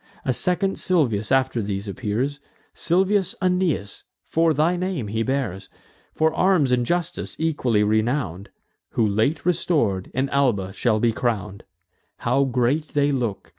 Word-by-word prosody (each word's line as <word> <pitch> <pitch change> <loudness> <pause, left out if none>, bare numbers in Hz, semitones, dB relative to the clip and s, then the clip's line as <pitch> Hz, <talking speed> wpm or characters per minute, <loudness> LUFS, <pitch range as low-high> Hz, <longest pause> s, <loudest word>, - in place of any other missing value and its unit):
A 130 - +1
second 185 - 0
Silvius 125 - +1
after 130 -3 +2
these 100 0 -4
appears; 125 +6 -2 0.3
Silvius 190 +3 +1
Aeneas, 180 - 0 0.2
for 165 0 +2
thy 155 +4 +2
name 175 - -3
he 110 +2 -1
bears; 130 -7 -2 0.5
For 160 0 +2
arms 175 -9 +3
and 125 -1 +1
justice 175 -1 -2
equally 130 -9 +1
renown'd, 110 - 0 0.4
Who, 115 - +2
late 110 +11 0
restor'd, 145 - +1
in 130 +2 +1
Alba 115 -10 +1
shall 110 0 +1
be 115 +1 +2
crown'd. 105 -4 -3 0.5
How 140 0 +1
great 135 +5 0
they 145 0 +3
look! 120 -10 -3
130 Hz, 135 wpm, -23 LUFS, 110-160 Hz, 0.5 s, arms